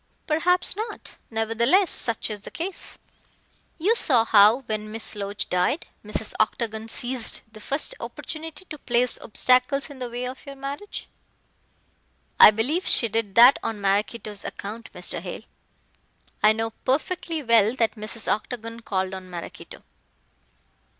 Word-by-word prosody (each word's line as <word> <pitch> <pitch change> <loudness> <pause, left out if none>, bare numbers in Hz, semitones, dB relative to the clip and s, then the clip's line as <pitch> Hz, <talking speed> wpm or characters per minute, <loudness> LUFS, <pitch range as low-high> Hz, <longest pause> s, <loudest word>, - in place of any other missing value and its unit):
"Perhaps 355 +5 +2
not. 435 +1 -6
Nevertheless, 235 - +2
such 230 -1 0
is 210 - -5
the 200 - -10
case. 360 +3 -5 0.8
You 400 +8 +2
saw 245 - +3
how, 215 +4 +6
when 215 -3 -4
Miss 225 0 +2
Loach 200 0 -3
died, 180 - 0 0.2
Mrs. - - -2
Octagon 220 -2 -1
seized 245 +1 0
the 215 - -12
first 280 - -3
opportunity 325 +3 -6
to 305 -4 -9
place 245 0 +1
obstacles 255 +6 +2
in 275 - -11
the 250 -1 -4
way 245 +1 -4
of 255 +1 -7
your 280 -1 -9
marriage." 280 +9 -6 1.3
"I - - +11
believe 255 - 0
she 230 - +3
did 210 -2 -2
that 245 +4 +8
on 225 -2 -3
Maraquito's 205 +1 -1
account, 220 +3 -7
Mr. - - +1
Hale. - - -7 1.0
I 215 - +6
know 225 +1 -2
perfectly 315 +3 -1
well 230 -1 +4
that 230 -3 +1
Mrs. 215 0 -5
Octagon 230 +1 -3
called 190 -4 -2
on 185 -1 -8
Maraquito." 175 -1 -9
230 Hz, 140 wpm, -24 LUFS, 215-275 Hz, 1.3 s, I